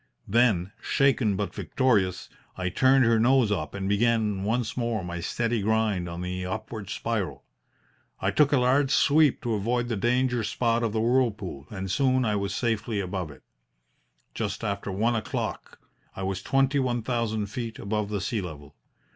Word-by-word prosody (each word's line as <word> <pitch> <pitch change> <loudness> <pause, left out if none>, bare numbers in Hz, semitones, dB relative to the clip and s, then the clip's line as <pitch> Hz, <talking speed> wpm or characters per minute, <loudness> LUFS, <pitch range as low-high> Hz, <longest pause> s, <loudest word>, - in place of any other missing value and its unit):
Then, 105 -5 +2
shaken 135 -7 +2
but 100 +1 -3
victorious, 100 -9 0 0.3
I 90 0 -1
turned 130 +6 +4
her 115 -1 +4
nose 120 -1 +4
up 75 -4 -2
and 95 -1 -3
began 105 -1 +1
once 110 +1 -1
more 115 -5 -1
my 85 0 -5
steady 115 +6 -1
grind 105 -4 +1
on 85 +1 -6
the 90 0 -3
upward 110 +1 -5
spiral. 110 -5 -3 0.8
I 95 - 0
took 140 +8 +3
a 145 - +4
large 130 +2 +3
sweep 145 0 +4
to 120 - -1
avoid 120 +4 0
the 115 - 0
danger 125 +2 +1
spot 115 +1 0
of 115 -2 0
the 110 +1 0
whirlpool, 110 - 0
and 95 -2 -5
soon 130 +2 +2
I 105 -1 +1
was 100 -1 -2
safely 110 -2 -1
above 90 -3 -3
it. 70 -3 -14 0.9
Just - - -3
after 100 - -2
one 115 +5 +1
o'clock 110 - -4 0.4
I 95 - -5
was 95 -1 -2
twenty 135 +4 +2
one 120 -3 0
thousand 110 -3 -1
feet 115 -1 -5
above 105 0 -2
the 105 -2 -2
sea 105 +3 -1
level. 75 -5 -9
110 Hz, 170 wpm, -26 LUFS, 95-120 Hz, 0.9 s, turned